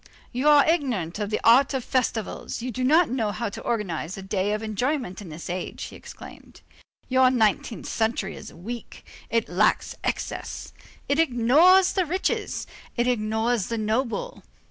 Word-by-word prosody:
"You 255 +4 +2
are 295 -1 +6
ignorant 240 - 0
of 205 -1 -2
the 215 - -1
art 265 +4 +5
of 260 - -2
festivals. 240 -5 -2
You 250 - -3
do 255 +2 -3
not 310 +3 +4
know 225 -5 0
how 230 +1 -3
to - - -8
organize 190 -6 -3
a 195 - -7
day 195 +1 -1
of 210 +1 -2
enjoyment 220 -1 -2
in 190 - -9
this 155 +2 -8
age," 180 +1 -4
he - - -8
exclaimed. - - -12 0.5
"Your 260 0 +5
nineteenth 225 -2 0
century 220 -3 -1
is - - -10
weak. 225 +7 -8 0.2
It 230 0 +1
lacks 200 +5 +1
excess. - - -4 0.3
It 285 +2 +1
ignores 325 +7 +5
the 370 -3 +1
rich, 370 +5 0
it - - -3 0.4
ignores 220 -2 0
the 230 - -2
noble. 240 - -2
230 Hz, 165 wpm, -25 LUFS, 210-265 Hz, 0.5 s, are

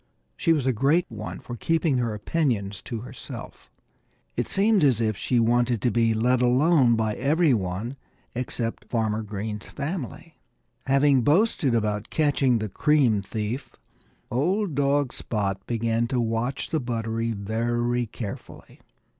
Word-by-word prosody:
She 165 - +1
was 150 -5 +2
a 130 - +2
great 145 +10 +2
one 110 -1 -6
for 120 - -7
keeping 160 0 +1
her 115 -3 -1
opinions 105 - -1
to 115 -3 -4
herself. 125 - -9 0.7
It - - -1
seemed 205 -2 +3
as 130 -6 +4
if 110 -2 +1
she 120 +4 0
wanted 120 0 +2
to 120 - +3
be 115 0 +2
let 125 +3 +2
alone 125 0 +4
by 110 -1 0
every 150 +4 +2
one 105 +5 -2 0.4
except 120 -1 -3
Farmer 110 -2 0
Green's 105 0 -5
family. 150 +1 -6 0.5
Having 135 0 +4
boasted 150 - +2
about 105 -2 -1
catching 140 -5 +2
the 110 -1 -2
cream 125 -1 +2
thief, 105 +6 -4 0.6
old 175 - 0
dog 140 -1 +1
Spot 100 -3 -2
began 115 0 0
to 125 +1 -1
watch 115 +3 -2
the 160 - +1
buttery 115 -2 -2
very 120 +3 -1
carefully. 105 -1 -8
120 Hz, 140 wpm, -25 LUFS, 110-140 Hz, 0.7 s, as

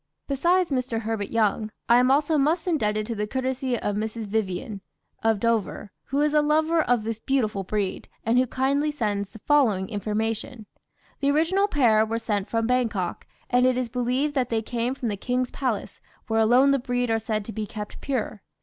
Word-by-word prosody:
Besides 345 +5 +2
Mr. 255 -4 -1
Herbert 220 -2 -3
Young, 215 -1 +1 0.2
I 235 - +6
am 250 +1 +3
also 290 +3 +3
much 305 +6 +2
indebted 215 - 0
to 230 - -3
the 210 -1 -2
courtesy 260 0 -1
of 205 -2 -2
Mrs. 220 +1 -3
Vyvyan, 205 0 -3 0.4
of 225 -2 +2
Dover, 225 -3 -1
who 280 +2 0
is 300 0 +2
a 300 - +5
lover 315 +2 +2
of 245 -6 +1
this 225 0 -3
beautiful 220 -6 0
breed, 200 0 -3 0.2
and 230 +3 +3
who 255 - +2
kindly 275 +4 +1
sends 210 -8 -2
the 220 - -12
following 220 -7 +2
information: 220 +2 -3 0.5
"The 280 - +1
original 335 +7 +2
pair 235 - +4
were 225 +1 -2
sent 210 -4 -2
from 225 -1 0
Bangkok, 225 -7 -1 0.2
and 250 +1 +3
it 255 -1 +2
is 250 -2 -1
believed 250 +4 0
that 255 -4 0
they 225 -1 0
came 240 +3 -2
from 250 - -4
the 205 - -3
King's 250 +3 -1
Palace, 255 -7 -3 0.2
where 225 -2 0
alone 245 +5 +5
the 275 - +2
breed 245 -1 -1
are 225 - +2
said 215 -1 -2
to 225 - -7
be 215 -1 -4
kept 210 0 -7
pure. 245 -6 -3
235 Hz, 195 wpm, -25 LUFS, 215-270 Hz, 0.5 s, I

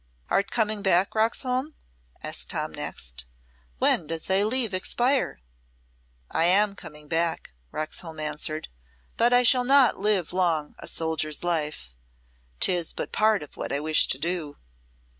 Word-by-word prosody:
"Art 200 - +2
coming 215 -2 0
back, 190 -1 +3
Roxholm?" 250 +6 0 0.5
asked - - -1
Tom - - -2
next. - - -5 0.5
"When 155 - +2
does 165 0 -4
thy 190 +1 +2
leave 225 0 +1
expire?" 245 - 0 0.9
"I 165 - +2
am 200 +3 +4
coming 150 -5 -11
back," 165 - -1 0.2
Roxholm 155 +1 -6
answered, 155 0 -3 0.5
"but 235 +1 +3
I 245 0 +5
shall 250 +1 +5
not 270 -1 +5
long - - -9
live 180 -6 +1
a - - -8
soldier's 160 -1 -1
life. 150 - -2 0.6
'Tis 175 -3 0
but - - -5
part 215 -4 +2
of 150 - -13
what - - -5
I 140 - 0
wish 155 +1 +3
to - - 0
do." 165 -1 -3
175 Hz, 140 wpm, -26 LUFS, 155-215 Hz, 0.9 s, I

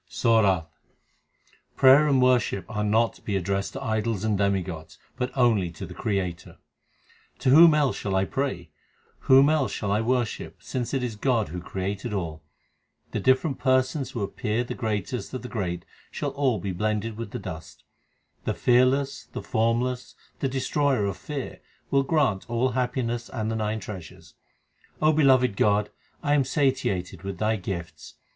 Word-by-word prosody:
SORATH 100 -8 +3 1.1
Prayer 135 +3 +7
and 135 -3 +3
worship 125 -6 +2
are 105 -1 -3
not 110 +2 +2
to - - -19
be 100 - -3
addressed 95 +1 -1
to - - -6
idols 110 -2 -1
and 110 -1 +1
demigods, 95 -5 -2 0.2
but 125 - -2
only 110 -8 +3
to 85 +3 -8
the 90 - -9
Creator: 95 -5 -3 0.8
To - - 0
whom 160 +2 +8
else 145 -3 +1
shall 95 -1 -2
I 95 0 +2
pray? 95 - -3 0.5
whom 135 +1 +6
else 155 -3 +2
shall 100 -2 -3
I 105 +2 +2
worship, 120 -1 -1
since 125 +1 -3
it 130 - -1
is 120 -3 -3
God 115 - +1
who 90 +2 -5
created 100 +5 -4
all? 80 -5 -3 0.7
The - - -2
different 130 +2 +2
persons 130 +1 +1
who 120 -5 -4
appear 110 +3 -2
the 125 - -5
greatest 110 +4 -3
of 130 - -5
the - - -5
great 90 -8 -3 0.2
shall - - -3
all 135 -5 +1
be 95 +1 -4
blended 105 +4 -2
with 115 -1 -6
the - - -5
dust. - - -9 0.6
The - - -1
Fearless, 130 +3 +2
the - - -5
Formless, 120 +3 -1 0.2
the 135 - 0
Destroyer 135 -3 +1
of 100 - -2
fear 145 -3 -6 0.3
will 140 - +4
grant 135 - 0
all 120 +2 +1
happiness 125 -2 -2
and 110 -3 -3
the - - -2
nine 110 0 -1
treasures. 90 -4 -10 0.7
O 155 +1 +4
beloved 130 -7 +4
God, 105 +1 +2 0.3
I 145 - +2
am 145 -2 +4
satiated 125 - -1
with 95 -1 -5
Thy 110 +3 +1
gifts. 85 -6 -7
115 Hz, 165 wpm, -26 LUFS, 100-130 Hz, 1.1 s, whom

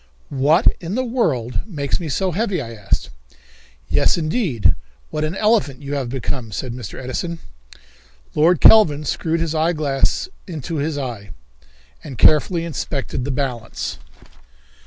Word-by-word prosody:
"What 145 +6 +3
in 175 +4 -4
the 255 - +1
world 150 - 0
makes 145 -8 -2
me 165 -3 -5
so 185 +6 0
heavy?" 195 0 0
I 115 -5 -6
asked. 100 - -2 0.8
"Yes, - - +3
indeed, 155 - +1 0.4
what 155 - -2
an 155 +4 -1
elephant 195 - +1
you 140 +1 -4
have 135 -4 -2
become," 125 -2 -3
said 120 +4 -4
Mr. 125 -1 -7
Edison. 165 +7 -3 1.0
Lord 165 +2 +4
Kelvin 155 -10 +7
screwed 165 +3 -1
his 165 -2 -1
eyeglass 155 - +1 0.2
in 160 -7 -6
his 155 -1 -2
eye, 120 -8 -5 0.7
and 130 - -8
carefully 165 - +4
inspected 135 -4 -3
the - - -3
balance. 125 -4 -3
150 Hz, 135 wpm, -21 LUFS, 130-170 Hz, 1.0 s, Kelvin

